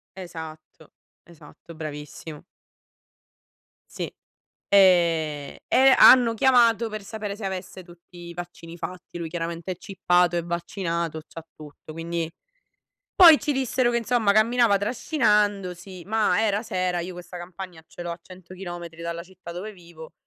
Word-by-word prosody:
Esatto, 160 -4 -10 0.4
esatto 170 0 -15
bravissimo. 150 0 -8 1.5
Sì, - - -3 0.6
e 165 -7 +3
e 265 0 +5
hanno 245 -3 +7
chiamato 235 -2 +4
per 215 -1 -6
sapere 210 -1 -6
se 210 -2 -5
avesse 185 0 -6
tutti 175 0 -17
i 170 - -9
vaccini 175 -1 -9
fatti. 180 0 -8
Lui 170 -2 -5
chiaramente 170 +1 -4
è - - -8
chippato, 180 -1 +1
è 170 - 0
vaccinato, 170 -2 -3
c'ha 165 - -10
tutto 150 0 -12
quindi 165 0 -3 0.8
poi, 335 -4 +9
ci 295 +1 -2
dissero 260 -2 +1
che 235 - +1
insomma 230 -2 +2
camminava 220 0 +4
trascinandosi, 205 - 0
ma 220 +1 +1
era 210 0 0
sera, 185 -5 -1
io 180 +2 -6
questa 180 0 -10
campagna 175 -1 -9
ce - - -12
l'ho 175 0 -4
a 170 - -7
100 185 0 -14
chilometri 175 -3 -8
dalla 170 0 -5
città 185 -1 -12
dove 190 +5 -7
vivo, 170 -4 -13
180 Hz, 140 wpm, -24 LUFS, 170-210 Hz, 1.5 s, poi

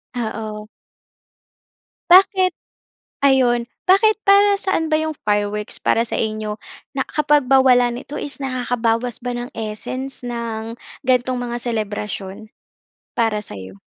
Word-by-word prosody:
Oo. 215 -2 -4 1.4
Bakit? 375 0 +6 0.7
Ayun. 255 -3 +4 0.2
Bakit 425 +3 +5
para 400 +1 +6
saan 325 -5 0
ba 310 - +4
'yong 315 0 -2
fireworks 210 0 -1
para 230 - +2
sa - - -3
inyo? 215 -1 -2 0.4
Na 265 - +1
kapag 295 -3 +2
ba 270 0 +6
wala 250 -2 +5
nito 270 +4 -8
is 290 - -5
nakakabawas 245 -2 -1
ba 245 - -2
ng 240 0 -4
essence 225 +5 -5
ng 230 -1 -4 0.3
ganitong 255 0 +2
mga 240 -1 -4
selebrasyon? 210 -2 -4 0.7
Para 225 -2 +1
sa'yo? 95 - -9
240 Hz, 120 wpm, -20 LUFS, 215-270 Hz, 1.4 s, Bakit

